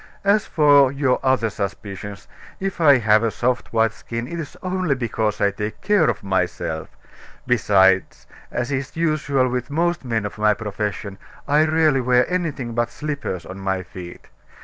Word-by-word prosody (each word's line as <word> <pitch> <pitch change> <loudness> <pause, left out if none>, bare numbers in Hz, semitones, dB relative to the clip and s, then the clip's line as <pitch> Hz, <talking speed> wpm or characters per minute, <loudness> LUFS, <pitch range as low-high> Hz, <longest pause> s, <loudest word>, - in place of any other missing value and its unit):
As 200 +1 +3
for 145 -3 +5
your 135 -2 +1
other 130 -4 +2
suspicions, 100 0 -6 0.3
if 190 -2 -3
I 145 -4 +7
have 110 -2 +4
a 115 - +1
soft 125 +3 -1
white 115 -1 +2
skin, 115 +1 -6
it 170 +4 -5
is 155 -4 -7
only 185 -5 0
because 110 -4 -2
I 100 - +3
take 105 +2 -5
care 205 -7 +3
of - - -3
myself. 90 -4 -2 0.5
Besides, 95 -5 +3 0.3
as 125 +3 -2
is 135 0 -3
usual 150 -5 +1
with 125 +1 -3
most 170 +2 0
men 115 -4 -1
of 105 +1 -6
my 105 0 +3
profession, 105 -1 -4 0.3
I 150 +2 +4
rarely 155 -3 +3
wear 125 0 +3
anything 155 -10 -2
but 120 0 0
slippers 140 - -5
on 95 +3 -8
my 95 -1 -2
feet. 90 -1 -10
120 Hz, 165 wpm, -21 LUFS, 105-145 Hz, 0.5 s, I